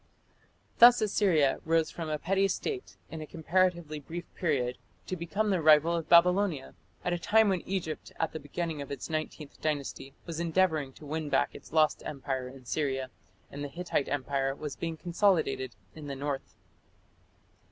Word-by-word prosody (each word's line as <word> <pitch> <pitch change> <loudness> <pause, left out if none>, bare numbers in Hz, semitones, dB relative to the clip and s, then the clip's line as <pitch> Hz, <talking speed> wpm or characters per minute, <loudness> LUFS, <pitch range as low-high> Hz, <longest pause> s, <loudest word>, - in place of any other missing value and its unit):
Thus 240 +1 +9
Assyria 190 -9 +2
rose 165 0 +2
from 165 -2 -5
a 155 - 0
petty 195 +5 +2
state 385 - -4
in 160 - -6
a 155 - -7
comparatively 170 -1 0
brief 170 +4 -6
period 125 -7 -1 0.3
to 185 - -3
become 200 +5 -1
the 185 -3 +1
rival 155 +2 +6
of 165 -2 -4
Babylonia, 175 -4 +4 0.3
at 180 - +1
a 175 - -1
time 220 +4 +4
when 185 -3 +1
Egypt 180 -5 -3
at 160 - 0
the 160 - -5
beginning 155 +1 -4
of 140 - -7
its 140 +3 -5
Nineteenth 155 -1 -5
Dynasty 140 -3 -3
was 165 -2 -5
endeavouring 165 -4 +1
to 150 - -13
win 155 +1 -3
back 135 - +2
its - - -12
lost 155 -1 +3
empire 135 -2 -4
in 130 -1 -13
Syria, 135 -1 -1 0.4
and 145 +1 -6
the - - -3
Hittite 170 -2 -2
empire 135 -1 -1
was 150 -1 -6
being 165 -1 -4
consolidated 170 - +1 0.2
in 155 -2 -9
the 140 - -4
north. 140 0 -4
155 Hz, 170 wpm, -30 LUFS, 140-175 Hz, 0.4 s, Thus